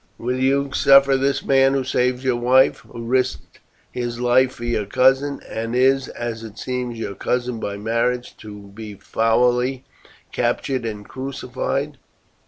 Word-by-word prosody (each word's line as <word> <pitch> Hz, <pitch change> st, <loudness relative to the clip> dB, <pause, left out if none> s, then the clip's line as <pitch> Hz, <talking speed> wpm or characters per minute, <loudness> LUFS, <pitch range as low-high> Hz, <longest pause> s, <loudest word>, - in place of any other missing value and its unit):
Will 125 Hz, +2 st, -2 dB
you 135 Hz, +1 st, +1 dB
suffer 140 Hz, 0 st, +5 dB
this 135 Hz, +1 st, 0 dB
man, 135 Hz, 0 st, +4 dB
who 135 Hz, -, 0 dB
saved 125 Hz, 0 st, 0 dB
your 130 Hz, -2 st, +1 dB
wife, 125 Hz, +2 st, +4 dB
who 115 Hz, -, -10 dB
risked 130 Hz, +1 st, -1 dB, 0.3 s
his 120 Hz, -1 st, -4 dB
life 125 Hz, +1 st, +3 dB
for 120 Hz, -, -10 dB
your 110 Hz, -4 st, -1 dB
cousin, 135 Hz, +5 st, +2 dB
and 115 Hz, +1 st, -4 dB
is, 135 Hz, +1 st, +3 dB
as 115 Hz, -1 st, -5 dB
it 110 Hz, -1 st, -10 dB
seems, 125 Hz, -2 st, -4 dB
your 105 Hz, -3 st, -4 dB
cousin 125 Hz, +3 st, -2 dB
by 100 Hz, -2 st, -4 dB
marriage, 115 Hz, +3 st, -1 dB
to 105 Hz, -2 st, -11 dB
be 105 Hz, -1 st, -8 dB
foully 125 Hz, +5 st, +1 dB, 0.5 s
captured 130 Hz, -3 st, -1 dB
and 105 Hz, -2 st, -6 dB
crucified?" 135 Hz, +2 st, -4 dB
125 Hz, 150 wpm, -21 LUFS, 115-130 Hz, 0.5 s, suffer